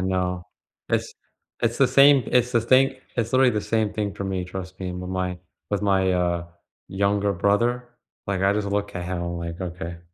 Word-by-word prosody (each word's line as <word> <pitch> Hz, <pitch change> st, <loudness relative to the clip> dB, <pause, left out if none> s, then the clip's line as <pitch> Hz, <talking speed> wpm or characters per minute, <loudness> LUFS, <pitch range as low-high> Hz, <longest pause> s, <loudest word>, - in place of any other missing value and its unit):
know. 90 Hz, -1 st, -1 dB, 0.4 s
It's -, -, -1 dB, 0.5 s
it's 115 Hz, 0 st, +1 dB
the 135 Hz, -, +5 dB
same 140 Hz, 0 st, +6 dB
it's 125 Hz, 0 st, +2 dB
the 120 Hz, -, +3 dB
same 130 Hz, +2 st, +4 dB, 0.2 s
it's 115 Hz, 0 st, -1 dB
literally 130 Hz, -1 st, +5 dB
the 105 Hz, -, 0 dB
same 110 Hz, -1 st, 0 dB
thing 105 Hz, -2 st, -3 dB
for 100 Hz, -, -5 dB
me, 95 Hz, -2 st, -2 dB
trust 95 Hz, +1 st, -8 dB
me, 90 Hz, -1 st, -3 dB
with 90 Hz, 0 st, -6 dB
my 90 Hz, -1 st, -2 dB, 0.3 s
with 105 Hz, 0 st, -1 dB
my, 95 Hz, -2 st, +2 dB
uh, 85 Hz, -1 st, 0 dB, 0.4 s
younger 100 Hz, +1 st, +1 dB
brother. 120 Hz, +7 st, +1 dB, 0.4 s
Like, 95 Hz, -1 st, -1 dB
I 100 Hz, -, +4 dB
just 105 Hz, 0 st, -1 dB
look 100 Hz, 0 st, -2 dB
at 90 Hz, -, -4 dB
how, 90 Hz, -1 st, -3 dB
like, 85 Hz, 0 st, -5 dB
okay. 85 Hz, -1 st, -6 dB
100 Hz, 190 wpm, -24 LUFS, 90-115 Hz, 0.5 s, same